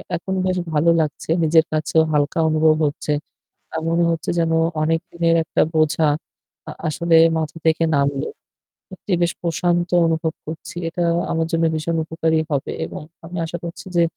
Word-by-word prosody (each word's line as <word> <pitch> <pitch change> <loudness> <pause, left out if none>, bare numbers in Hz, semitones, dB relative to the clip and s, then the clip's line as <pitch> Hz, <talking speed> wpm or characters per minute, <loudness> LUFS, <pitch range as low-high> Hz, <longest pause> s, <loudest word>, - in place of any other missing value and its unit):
এখন 180 +3 -4
বেশ 185 -1 0 0.2
ভালো 155 +3 +3
লাগছে। 150 0 -4
নিজের 160 0 +4
কাছেও 155 +1 +2
হালকা 145 +2 +1
অনুভব 155 0 +4
হচ্ছে। 145 +1 -2 0.6
অ্যাঁ 160 - -4
মনে 170 +1 +2
হচ্ছে 165 -1 -3
যেন 165 -1 +1 0.3
অনেক 165 +1 +2
দিনের 170 -1 +2
একটা - - 0
বোঝা 155 0 +3 0.6
আ - - -4 0.2
আসলে 165 +2 +2 0.2
মাথা 160 0 -3
থেকে 160 +1 +3
নামল। 140 -1 +1 0.7
সত্যিই 185 0 -3
বেশ 175 +1 +1
প্রশান্ত 175 +1 0 0.2
অনুভব 160 0 0
করছি। 160 +2 -8
এটা 175 +1 -2 0.3
আমার 165 0 0
জন্য 165 0 +1
ভীষণ 160 +2 -2
উপকারী 160 0 0
হবে 140 -2 -1
এবং 85 - -7 0.2
আমি 175 +2 -7
আশা 170 +1 -5
করছি 170 +2 -7
যে 170 - +5
160 Hz, 160 wpm, -21 LUFS, 155-170 Hz, 0.7 s, যে